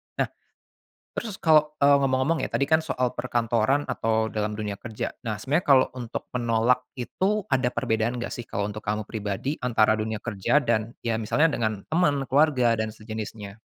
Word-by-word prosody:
Nah, - - -1 0.8
terus 215 -5 -5
kalau 155 -3 +3
eee, 140 0 +5
ngomong-ngomong 135 +4 +1
ya - - -1
tadi 140 - +1
kan 160 +3 +3
soal 130 -6 -1
perkantoran 120 +2 +1
atau 110 0 0
dalam 105 -1 -2
dunia 105 -2 -4
kerja, 110 -3 -4
nah 110 -2 -3
sebenarnya 145 - -1
kalau 130 -2 +6
untuk 125 -2 -5
menolak 120 0 +1
itu 190 - -1
ada 130 -2 +3
perbedaan 115 0 -1
enggak 120 - -4
sih 120 - -7
kalau 100 - -2
untuk 105 +1 -5
kamu 105 0 -2
pribadi 105 +7 -4
antara 110 -3 +3
dunia 110 -1 -4
kerja 105 +4 0
dan 115 0 0
ya 115 -1 0
misalnya 150 +8 +2
dengan 110 -3 -2
temen, 145 -5 +2
keluarga 135 -5 +4
dan 110 - -1
sejenisnya? 110 -1 -7
120 Hz, 170 wpm, -25 LUFS, 110-140 Hz, 0.8 s, kalau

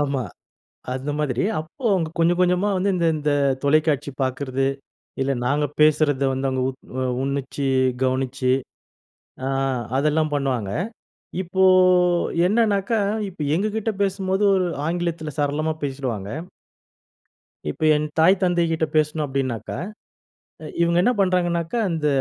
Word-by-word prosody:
ஆமா. 140 -3 0 0.7
அந்த 135 +3 -3
மாதிரி, 130 -4 0 0.2
அப்போ 160 - -13
அவங்க 165 -4 0
கொஞ்சம் 170 +1 +3
கொஞ்சமா 180 +2 +2
வந்து 195 +2 +1
இந்த 170 -2 +1
இந்த 150 0 -1 0.3
தொலைக்காட்சி 145 -1 +2
பார்க்கறது. 130 0 -1 0.5
இல்ல 135 +1 +1
நாங்க 145 +3 +1
பேசுறத 150 -2 +3
வந்து 135 +1 -2
அவங்க 130 -1 -1
உத் 130 0 -7 0.2
அ - - 0 0.2
உண்ணிச்சு, 140 0 -2 0.4
கவனிச்சு. 130 0 0 0.9
அ. - - 0 0.5
அதெல்லாம் 155 +1 +1
பண்ணுவாங்க. 130 -8 -1 0.7
இப்போ 190 +1 0 0.8
என்னனாக்கா, 215 0 +2 0.3
இப்ப 175 -4 -10
எங்ககிட்ட 215 +3 -1
பேசும்போது 195 0 0
ஒரு 185 -1 +1 0.2
ஆங்கிலத்தில 170 -2 -2
சரளமா 150 +2 0
பேசிடுவாங்க! 130 -8 -3 1.4
இப்ப 75 - -6
என் 150 0 0
தாய், 165 +4 +6
தந்தைகிட்ட 170 -3 +1
பேசணும் 155 0 +1
அப்படினாக்கா, 130 -5 -3 0.9
அ - - -6 0.2
இவங்க 170 0 +3
என்ன 245 +7 +3
பண்றாங்கன்னாக்கா, 175 +1 +1
இந்த 155 -2 0
155 Hz, 120 wpm, -23 LUFS, 135-175 Hz, 1.4 s, தாய்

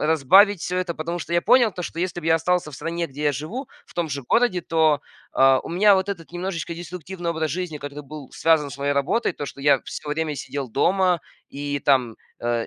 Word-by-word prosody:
разбавить 170 +6 +5
всё 180 - -3
это. 180 -2 -2
Потому 170 +3 -4
что 170 - -6
я 170 - +3
понял 240 +1 +5
то, 180 - -6
что 165 -1 -5
если 175 -1 -2
бы 160 - -7
я 160 - +5
остался 175 0 0
в - - -9
стране, 170 +4 -3
где 145 +1 -8
я 145 - +3
живу, 195 - -5 0.2
в - - -19
том 170 -2 -1
же 140 -1 -4
городе, 230 - +2
то, 160 -2 +2 0.3
а, 135 0 +5
у - - -9
меня 200 +4 +5
вот 190 +1 0
этот 170 -5 -6
немножечко 175 -2 -4
деструктивный 175 +1 -6
образ 160 -2 -2
жизни, 170 -1 -4
который 145 +1 -7
был 145 -1 -10
связан 160 -3 +2
с 140 - -9
моей 140 +1 0
работой. 150 - +1
То 145 - -6
что 140 - -9
я 145 +1 +4
всё 150 - -7
время 155 0 -1
сидел 135 0 -5
дома 180 - +2 0.3
и 145 0 -3
там, 130 -5 +2 0.2
э, 120 -1 -1
160 Hz, 225 wpm, -23 LUFS, 145-180 Hz, 0.3 s, разбавить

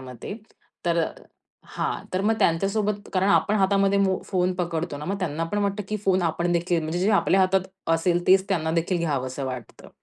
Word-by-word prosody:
मते. 125 - -8 0.5
तर 170 -1 +2 0.6
हां. - - -3
तर 185 - +1
मग 220 +3 +2
त्यांच्या 165 +4 +2
सोबत, 210 0 -2
कारण 190 +1 +2
आपण 210 +1 +3
हातामध्ये 195 0 +3
मो 190 -1 +2
फोन 185 -1 +1
पकडतो 170 -3 -3
ना, 150 - -7
मग 195 +3 -2
त्यांना 165 -3 -2
पण 205 +5 -2
वाटतं, 200 +1 -1
की 215 - -1
फोन 190 -1 +3
आपण 170 +1 0
देखील 170 0 +1
म्हणजे 160 +3 -2
जे 195 +4 +2
आपल्या 195 -1 +3
हातात 190 0 +3 0.3
असेल 175 +1 0
तेच 190 +1 +5
त्यांना 160 -4 0
देखील 170 +2 0
घ्यावसं 140 -4 -2
वाटतं. 125 -3 -8
180 Hz, 190 wpm, -25 LUFS, 165-195 Hz, 0.6 s, तेच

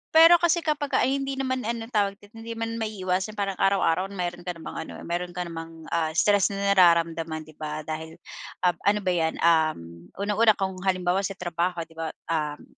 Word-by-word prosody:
pero 330 +2 +9
kasi 340 0 +2
kapagka 295 -2 +1
hindi 275 +1 0
naman 260 -3 -2
ano 230 0 -4
tawag 200 -2 +1 0.2
hindi 225 +1 -8
man 230 0 -3
maiiwasan 200 -1 -2
parang 195 -2 -2
araw-araw 195 -2 +2
meron 175 -1 -4
ka 175 - -2
namang 165 - -7
ano, - - -9
ah, - - -10
meron 175 +1 -3
ka 180 - -2
namang, 165 -1 -8
ah, 160 -2 0
stress 205 +1 +4
na 200 0 0
nararamdaman, 165 -3 +3
'di 155 - -15
ba 155 0 -4
dahil, 160 +1 -6 0.5
um, 180 -2 +3
ano 210 +1 +4
ba 185 - +1
'yan, 160 -2 0
um, 155 - +1
unang-una 210 +2 +3
kung 190 -1 -1 0.2
halimbawa 185 0 +1
sa 195 0 -3
trabaho 175 -1 -2
'di 165 0 -16
ba, 160 -1 -4 0.2
um, 150 -2 -2
180 Hz, 190 wpm, -26 LUFS, 165-215 Hz, 0.5 s, pero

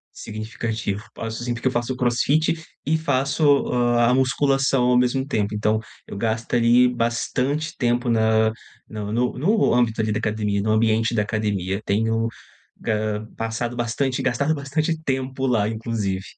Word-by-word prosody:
Significativo. 110 -1 -4
Faço 115 +1 -5
sim, 120 0 -2
porque 120 - -6
eu - - -4
faço 120 +1 -1
crossfit 130 +6 +2 0.3
e 160 +2 +1
faço, 145 -1 +2
hã, 120 -1 +2
a - - +4
musculação 135 0 +2
ao 125 0 +4
mesmo 125 +2 +1
tempo. 105 -6 -1
Então 105 +1 +1 0.3
eu - - -8
gasto 110 +1 -2
ali 120 +1 +5
bastante 125 +5 -1
tempo 120 0 +1
na 110 -1 +3 0.4
no 105 -1 -5 0.3
no 205 - +2
âmbito 120 -3 +2
ali 110 -1 0
da 105 - 0
academia, 105 -2 -1
no 105 +2 -1
ambiente 110 +1 +2
da 105 - +2
academia. 105 -3 -2
Tenho, 115 +2 +1 0.6
hã, 110 0 -1
passado 115 +1 -3
bastante 125 +3 -1
gastado 140 +5 +1
bastante 150 +3 -1
tempo 130 -1 -2
lá, 115 -5 +2
inclusive. 110 -4 -3
115 Hz, 150 wpm, -23 LUFS, 110-130 Hz, 0.6 s, ali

